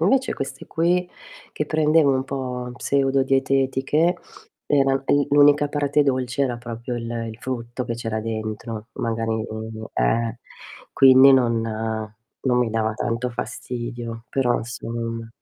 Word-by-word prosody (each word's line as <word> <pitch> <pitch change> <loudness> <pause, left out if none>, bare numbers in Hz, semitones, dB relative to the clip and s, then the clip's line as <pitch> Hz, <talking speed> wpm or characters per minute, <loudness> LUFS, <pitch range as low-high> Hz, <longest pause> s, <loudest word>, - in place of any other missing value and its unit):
invece 260 +10 +2
queste 135 0 -6
qui, 175 +2 +1 0.4
che 150 - -2
prendevo 155 -1 +3
un 130 0 0
po' 125 -2 -4
pseudo 135 +1 +1
dietetiche 135 +5 +1 0.5
era, 135 -2 +3
eh, 145 +1 +2
l'unica 145 0 +5
parte 145 0 +1
dolce 130 -1 0
era 125 -3 0
proprio 120 +1 -5
il 115 - -5 0.2
il 110 - -11
frutto 120 0 -4
che 115 - -3
c'era 115 -2 -3
dentro, 110 0 -5
magari 115 -1 -2
mhmm, 110 0 -6
eh, 115 - 0 0.5
quindi 135 0 +8
non 120 -3 +3 0.8
non 125 -2 +1
mi 120 -2 +1
dava 110 -1 0
tanto 120 +2 -2
fastidio 120 -1 -5
però 125 -3 +1
insomma. 115 -1 -5
125 Hz, 130 wpm, -23 LUFS, 115-135 Hz, 0.8 s, quindi